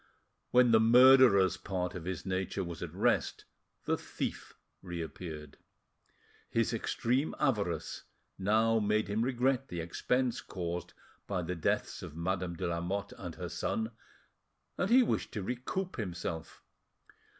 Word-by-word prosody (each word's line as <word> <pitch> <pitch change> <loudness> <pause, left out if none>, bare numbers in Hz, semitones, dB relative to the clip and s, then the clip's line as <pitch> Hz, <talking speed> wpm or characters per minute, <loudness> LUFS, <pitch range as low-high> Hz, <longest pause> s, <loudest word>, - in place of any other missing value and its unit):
When 125 -1 +5
the 110 - +7
murderer's 120 -4 +7
part 90 -2 -3
of 90 -2 -7
his 90 -2 -4
nature 95 +1 -2
was 85 -2 -7
at - - -4
rest, - - 0 0.4
the - - +1
thief - - -5 0.2
reappeared. 80 -4 -7 0.9
His 115 0 +1
extreme 125 +5 0
avarice 100 - 0 0.4
now 110 +3 +3
made 105 +1 +1
him 105 +2 0
regret 130 +2 +1
the 85 - -5
expense' 125 +9 0
caused 90 -1 -5 0.3
by 95 -3 -1
the 90 - -3
deaths 85 -3 -1
of - - -8
Madame 90 0 -2
de - - -3
Lamotte 90 +4 -2
and 90 -4 -7
her 90 - -5
son, 110 +6 -2 0.8
and 180 - -1
he 250 +2 +7
wished - - -1
to 105 - -3
recoup 130 - -3
himself. 85 -6 -5
100 Hz, 135 wpm, -32 LUFS, 90-120 Hz, 0.9 s, the